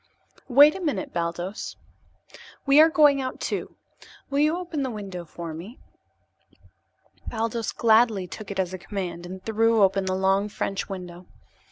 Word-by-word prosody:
"Wait 285 +4 +7
a - - -6
minute, 285 - -2
Baldos. 175 +3 -4 0.9
We 280 +2 +7
are 320 - +7
going 295 -3 +4
out, 255 -1 -5
too. - - -4 0.6
Will 280 - +1
you 305 +3 +3
open 350 -5 -4
that 265 - -1
window 195 -6 -7
for 165 0 -7
me?" 185 - -9 1.5
Baldos 230 0 -2
gladly 220 -4 +3
took 200 +4 -9
it 200 - -5
as 185 -1 -1
a 185 - -5
command 175 -3 -5
and 185 +1 -9
threw 225 0 +3
open 195 0 +2
the 185 0 -1
long 195 +2 +1
French 195 -1 -3
window. 180 -2 -8
205 Hz, 155 wpm, -25 LUFS, 185-255 Hz, 1.5 s, Wait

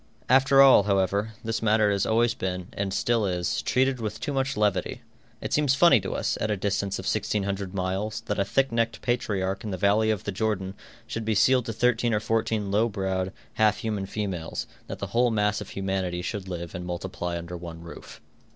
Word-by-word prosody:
After 135 +2 +6
all, 135 -5 +8
however, 100 +2 +1
this 115 0 -2
matter 110 -1 +3
has 100 -1 0
always 115 +1 +3
been, 90 -1 -4
and 100 -1 -2
still 115 +3 +1
is, 90 -1 -1
treated 130 -1 +1
with 105 -1 -4
too 145 - -3
much 135 +1 -1
levity. 105 -3 0 0.4
It - - -4
seems 145 -3 +3
funny 170 -3 +6
to 95 - -4
us, - - -1
at 105 - 0
a 105 - 0
distance 100 0 -1
of - - -7
1,600 100 -2 -1
miles, 95 +3 -2
that 105 - -3
a - - +4
thick 135 +6 +1
necked 115 -1 -1
patriarch 100 -6 -1
in 110 - -4
the 95 - -3
valley 105 +4 +3
of 110 -3 0
the 105 - -3
Jordan 95 -2 -2 0.3
should 115 0 -4
be 110 0 0
sealed 125 +4 +3
to 115 - -2
thirteen 120 0 +2
or - - +2
fourteen 110 -2 -1
low 110 +3 +2
browed, 95 -2 -2 0.2
half 110 -1 +3
human 105 -3 -3
females, 95 -5 -4
and - - -31
that - - -6
the - - -6
whole 120 +1 +4
mass 105 -1 +1
of 105 - -8
humanity 95 -2 -2
should 100 -1 -4
live 85 -2 -5
and 90 -1 -5
multiply 90 0 -4
under 85 +1 -7
one 85 -1 -8
roof. 85 0 -11
105 Hz, 205 wpm, -26 LUFS, 95-115 Hz, 0.4 s, all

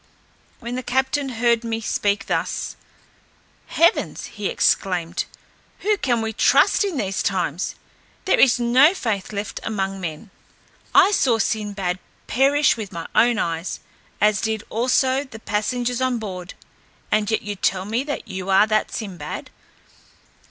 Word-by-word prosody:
When 235 0 -6
the 255 - -2
captain 265 +2 0
heard 235 -1 +1
me 225 -1 -2
speak 205 -2 0
thus, - - -2 0.9
"Heavens!" 335 +5 +2
he 205 -2 -3
exclaimed, 175 -2 +1 0.6
"whom 420 +1 +2
can 240 - 0
we 220 0 -3
trust 235 - +4
in 385 -7 -2
these 195 -5 -1
times? 185 -3 -1 0.5
There - - +3
is 250 -2 +5
no 255 +9 +5
faith 220 - -2
left 205 0 -4
among 195 -3 -3
men. 170 +4 -6 0.6
I 405 - +7
saw 255 - +3
Sinbad 200 -5 -1 0.3
perish 280 +4 +3
with 215 -3 -6
my 170 -2 -6
own 240 -1 +4
eyes, 165 -3 -2 0.4
as 210 0 +3
did 220 -1 -1
also 260 +3 +2
the 260 -5 -11
passengers 240 +4 -1
on 255 -1 +1
board, 185 -5 -7 0.6
and 215 -1 +2
yet 220 - 0
you 205 -1 -4
tell 190 -1 0
me 225 +5 -1 0.2
you 190 0 -6
are 195 +2 +6
that 215 0 0
Sinbad. 180 -9 -6
220 Hz, 140 wpm, -22 LUFS, 195-250 Hz, 0.9 s, I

